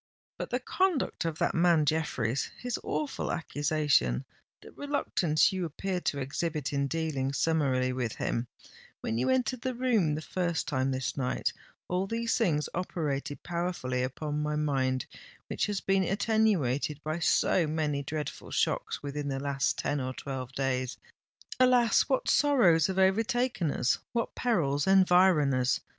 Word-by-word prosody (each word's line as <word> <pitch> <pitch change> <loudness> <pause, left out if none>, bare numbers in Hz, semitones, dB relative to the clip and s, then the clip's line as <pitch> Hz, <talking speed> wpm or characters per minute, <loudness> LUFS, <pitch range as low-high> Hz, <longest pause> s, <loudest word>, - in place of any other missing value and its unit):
But - - -4
the - - 0
conduct 370 - 0
of 165 -2 -2
that - - +1
man 170 -3 +4
Jeffreys—his 150 - -1
awful 295 -3 -2
accusation—the 145 - -1
reluctance 190 - +1
you 185 -1 -2
appeared 180 +3 -3
to 145 - 0
exhibit 145 +1 -2
in 140 0 +1
dealing 140 -4 -2
summarily 135 -5 +1
with 125 -3 -2
him, 120 +1 -2 0.5
when 115 - -2
you 125 - +1
entered 255 -1 +1
the 255 0 -2
room 225 -12 +2
the 155 - -5
first 170 0 -2
time 130 -2 0
this 130 -1 -2
night,—all 180 +7 -3
these 230 +2 -1
things 165 -11 +1
operated 150 -5 -3
powerfully 170 -8 -2
upon 145 +4 -3
my 150 0 -1
mind, 135 -4 0 0.4
which - - -1
has 205 -2 -2
been 195 0 +2
attenuated 190 - +1
by 155 +2 -2
so 170 0 +2
many 150 -2 -1
dreadful 150 +2 -5
shocks - - -1
within 145 0 -4
the 135 -1 -2
last 140 -1 0
ten 145 - -1
or 130 0 -4
twelve 130 -2 -5
days! 130 -2 -1 0.6
Alas! 250 -2 +4
what 265 - +1
sorrows 225 - +4
have 190 -1 -3
overtaken 220 - +2
us—what 230 - -1
perils 155 - 0
environ 185 -6 +5
us! 125 -1 +1
155 Hz, 140 wpm, -29 LUFS, 135-190 Hz, 0.6 s, environ